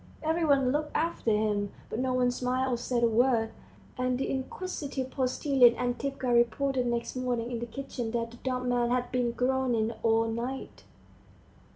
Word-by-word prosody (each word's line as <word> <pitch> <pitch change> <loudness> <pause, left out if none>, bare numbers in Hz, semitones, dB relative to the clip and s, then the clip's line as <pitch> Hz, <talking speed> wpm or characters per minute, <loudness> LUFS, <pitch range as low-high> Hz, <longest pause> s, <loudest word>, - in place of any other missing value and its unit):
Every 320 +2 +1
one 275 -4 +3
looked 300 +2 -2
after 330 -7 0
him, 210 -2 +1 0.2
but 225 - -4
no 260 0 0
one 250 -1 +3
smiled 255 +1 0
or - - 0
said 240 0 -1
a - - +6
word, 230 0 +2 0.5
and 255 0 +1
the 270 - -2
inquisitive 270 -1 -4
postilion 255 -2 +4
Antipka 250 +1 -1
reported 245 +2 +2
next 235 +1 -2
morning 245 -2 -2
in 235 - -2
the 235 - -4
kitchen 245 -1 -5
that 230 0 -2
the 240 - -12
dumb 255 0 -2
man 240 -1 +2
had 245 0 0
been 245 -2 +1
groaning 250 -3 +1
all 225 0 +3
night. 235 +4 -5
250 Hz, 170 wpm, -29 LUFS, 235-265 Hz, 0.5 s, a